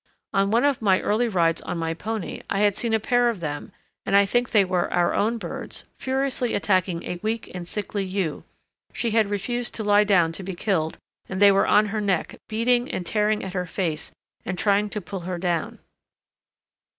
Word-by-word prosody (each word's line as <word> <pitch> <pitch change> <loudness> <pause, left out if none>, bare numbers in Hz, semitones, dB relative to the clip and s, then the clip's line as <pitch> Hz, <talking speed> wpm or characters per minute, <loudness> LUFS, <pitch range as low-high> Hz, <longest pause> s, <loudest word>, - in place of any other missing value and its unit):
On 195 0 +2
one 235 +5 +3
of 280 -4 +1
my 195 -3 +4
early 225 +4 +1
rides 170 -6 +1
on 175 - -4
my 165 0 -1
pony 215 +2 -4
I 195 - 0
had 205 -2 +3
seen 235 - -1
a 220 - +3
pair 245 +1 +2
of 225 -5 -3
them, 145 -3 -5 0.3
and 195 - +1
I 200 0 +6
think 240 +5 +1
they 205 -3 +4
were 180 -1 0
our 175 -1 +2
own 225 +3 +1
birds, - - -6 0.2
furiously 265 -2 -1
attacking 185 -4 +1
a 175 - -5
weak 220 +1 -3
and 180 -2 -6
sickly 205 +1 -3
ewe; 185 -4 -2 0.5
she 235 -2 -1
had 220 -2 +3
refused 240 +4 -2
to 220 - -2
lie 205 0 +5
down 180 -6 +3
to 165 - -6
be 190 0 -5
killed, 170 -4 -1 0.3
and 190 - -3
they 200 0 +8
were 195 0 +3
on 210 - +5
her 215 - 0
neck, 195 -4 0
beating 240 +3 +1
and 180 - -3
tearing 210 +2 +1
at 190 - -6
her 180 -1 -2
face 165 -3 -3 0.3
and 180 - -4
trying 205 +2 +2
to 210 - -4
pull 195 +1 -6
her 180 +1 -4
down. 170 -3 -1
200 Hz, 205 wpm, -24 LUFS, 180-220 Hz, 0.5 s, they